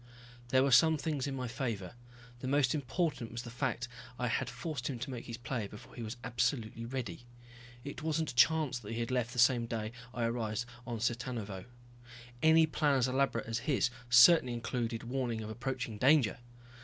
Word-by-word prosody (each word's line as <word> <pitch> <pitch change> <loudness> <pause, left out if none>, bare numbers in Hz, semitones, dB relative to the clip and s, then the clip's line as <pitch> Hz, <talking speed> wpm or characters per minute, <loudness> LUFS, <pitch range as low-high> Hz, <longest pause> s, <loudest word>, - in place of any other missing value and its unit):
There 130 +1 +4
were 140 - +2
some 160 +6 +6
things 145 -3 -2
in 135 - -3
my 130 -1 -3
favor. 110 -7 -3 0.5
The 130 - -5
most 135 -2 +3
important 150 -3 -1
was 120 +1 -5
the 120 - -8
fact 125 -1 -2 0.3
I 125 -1 -1
had - - 0
forced 130 0 -4
him 130 - -3
to 130 +3 -5
make 120 -2 -7
his 115 - -5
play 120 -3 -3
before 105 - -13
he 120 - -8
was 110 +2 -5
absolutely 115 -1 -1
ready. 120 -4 -5 0.6
It 140 +3 -7
wasn't 160 -3 -1
chance 135 0 +4
that 110 -1 -7
he 115 - -3
had 115 +1 -2
left 125 -2 0
the 125 - -9
same 120 -1 +4
day 110 -2 -3 0.2
I 120 - -3
arrived 115 0 -1 0.2
on 120 -2 -3
Cittanuvo. 115 -5 -3 0.8
Any 160 0 +6
plan 150 -2 +1
as 130 -1 +2
elaborate 130 -2 +1
as 115 0 -2
his 130 -2 +2 0.2
certainly 125 +1 +7
included 115 -1 -3
warning 120 -2 -2
of 110 0 -6
approaching 125 -2 -4
danger. 130 -3 +4
125 Hz, 185 wpm, -33 LUFS, 115-135 Hz, 0.8 s, certainly